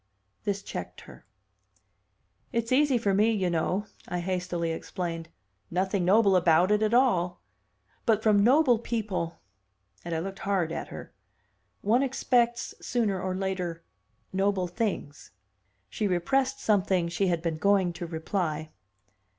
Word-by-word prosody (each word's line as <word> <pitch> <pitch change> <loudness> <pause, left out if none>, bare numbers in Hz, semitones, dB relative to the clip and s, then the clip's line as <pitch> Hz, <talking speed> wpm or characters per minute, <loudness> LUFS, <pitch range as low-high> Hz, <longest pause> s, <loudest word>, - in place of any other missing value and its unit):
This 200 -1 -1
checked - - -7
her. - - -15 1.2
"It's 230 0 -1
easy 275 0 +4
for 205 -4 +1
me, 210 +3 +4
you 190 -5 0
know," 180 +5 0 0.2
I 180 -1 -2
hastily 175 -2 -2
explained. 165 0 -4 0.4
"Nothing 190 +1 0
noble 200 +1 +5
about 175 +1 +4
it 210 0 +3
at 215 +2 +2
all. 180 -9 +2 0.6
But 220 -1 +3
from 205 -2 +4
noble 255 -1 +5
people" 210 -8 -3 0.6
and 170 -1 -3
I - - 0
looked 190 +3 -5
hard 190 -5 0
at - - -4
her - - -9 0.7
"one 230 +5 +3
expects, 240 -3 +1
sooner 210 -6 0
or 185 0 -2
later, 185 -3 -3 0.5
noble 195 -1 +1
things." 180 -7 -3 0.6
She 215 - -2
repressed 260 +9 +1
something 190 -4 +2
she 190 +3 0
had 170 -2 0
been 165 -2 -1
going 190 0 +2
to 170 0 -6
reply. 160 -2 -3
190 Hz, 135 wpm, -28 LUFS, 175-220 Hz, 1.2 s, noble